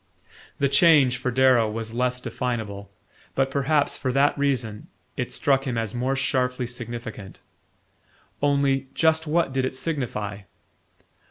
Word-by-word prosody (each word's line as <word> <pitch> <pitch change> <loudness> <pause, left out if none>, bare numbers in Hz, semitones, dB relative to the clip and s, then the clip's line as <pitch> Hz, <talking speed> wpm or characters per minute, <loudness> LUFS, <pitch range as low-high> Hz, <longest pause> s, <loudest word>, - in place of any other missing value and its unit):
The 140 - +2
change, 140 -3 +5
for 125 0 -2
Darrow, 125 -3 +4
was 110 +1 -5
less 125 +1 0
definable; 110 -6 -4 0.5
but, 135 0 +1
perhaps 140 +2 +1
for 130 - -1
that 140 +2 +3
reason, 130 -7 -1 0.3
it - - -3
struck 135 -1 +1
him 120 -3 -2
as 115 -2 -2
more 125 +2 -1
sharply 125 -2 0
significant. 120 -4 -7 1.0
Only 140 -2 +2
just 160 0 +2
what 160 -3 +1
did 130 -1 0
it 130 - -2
signify? 120 -9 -3
130 Hz, 135 wpm, -24 LUFS, 120-140 Hz, 1.0 s, change